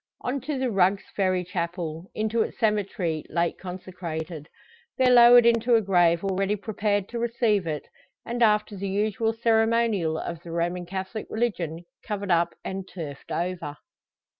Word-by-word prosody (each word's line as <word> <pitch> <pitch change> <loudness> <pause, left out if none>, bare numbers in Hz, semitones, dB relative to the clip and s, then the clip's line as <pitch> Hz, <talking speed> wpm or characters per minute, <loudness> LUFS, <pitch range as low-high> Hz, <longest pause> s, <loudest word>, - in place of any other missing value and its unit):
On 260 +2 -2
to 285 +2 -3
the 260 -2 -1
Rugg's 195 0 +2
Ferry 185 -2 +1
chapel, 170 -1 -4
into 220 +1 0
its - - -3
cemetery, 200 -7 0
late 170 0 -1
consecrated. 175 -4 -6 0.5
There 255 -1 +5
lowered 240 0 +8
into 235 +1 +4
a 225 - +4
grave 175 -3 +3
already 195 +1 0
prepared 205 -1 -1
to 235 - -4
receive 230 -5 +1
it; 150 -2 -4 0.4
and, 240 +1 -4
after 210 -2 +3
the 195 0 -4
usual 215 +3 0
ceremonial 225 -6 +2
of 170 0 -5
the 175 - -11
Roman 175 +1 -2
Catholic 190 +3 -5
religion 175 -8 -2 0.2
covered 200 -3 -3
up, 170 0 +2
and 190 0 -4
turfed 150 -7 -8
over. 170 -4 -3
195 Hz, 150 wpm, -26 LUFS, 175-225 Hz, 0.5 s, lowered